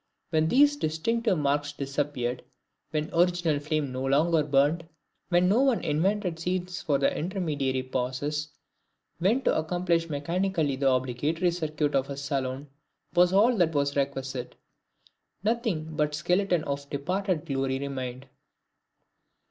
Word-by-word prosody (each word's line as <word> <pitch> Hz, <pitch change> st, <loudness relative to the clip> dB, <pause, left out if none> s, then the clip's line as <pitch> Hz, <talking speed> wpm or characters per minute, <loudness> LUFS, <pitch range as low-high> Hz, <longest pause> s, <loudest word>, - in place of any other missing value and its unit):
When 160 Hz, -1 st, +2 dB
these 290 Hz, -, +5 dB
distinctive 215 Hz, -, 0 dB
marks 145 Hz, 0 st, 0 dB
disappeared, 140 Hz, -3 st, -2 dB, 0.5 s
when 155 Hz, -1 st, -1 dB
the 165 Hz, -, -3 dB
original 175 Hz, -4 st, +2 dB
flame 150 Hz, -2 st, -1 dB
no 130 Hz, +1 st, -4 dB
longer 155 Hz, +4 st, +3 dB
burned, 145 Hz, +3 st, +1 dB, 0.4 s
when 175 Hz, 0 st, +4 dB
no 215 Hz, +7 st, +4 dB
one 270 Hz, -4 st, +2 dB
invented 175 Hz, +3 st, 0 dB
scenes 180 Hz, +1 st, -2 dB
for 145 Hz, -3 st, +1 dB
the 135 Hz, -, +1 dB
intermediary 150 Hz, -7 st, -1 dB
pauses, 130 Hz, +4 st, -2 dB, 0.7 s
when 220 Hz, +10 st, +2 dB
to -, -, +2 dB
accomplish 170 Hz, +1 st, 0 dB
mechanically 160 Hz, 0 st, 0 dB
the 135 Hz, 0 st, +2 dB
obligatory 140 Hz, +8 st, 0 dB
circuit 155 Hz, -3 st, -1 dB
of 135 Hz, 0 st, +1 dB
a 140 Hz, -, -5 dB
saloon, 135 Hz, 0 st, -3 dB, 0.5 s
was 180 Hz, 0 st, +5 dB
all 220 Hz, +6 st, +4 dB
that 165 Hz, -4 st, +2 dB
was 140 Hz, 0 st, +1 dB
requisite, 135 Hz, -2 st, -2 dB, 0.9 s
nothing 205 Hz, -9 st, -1 dB
but 150 Hz, -1 st, 0 dB
the -, -, -2 dB
skeleton 180 Hz, +1 st, +1 dB
of 140 Hz, -1 st, -4 dB
departed 180 Hz, +3 st, -1 dB
glory 135 Hz, -3 st, -1 dB
remained. 130 Hz, -2 st, -5 dB
155 Hz, 135 wpm, -27 LUFS, 140-180 Hz, 0.9 s, these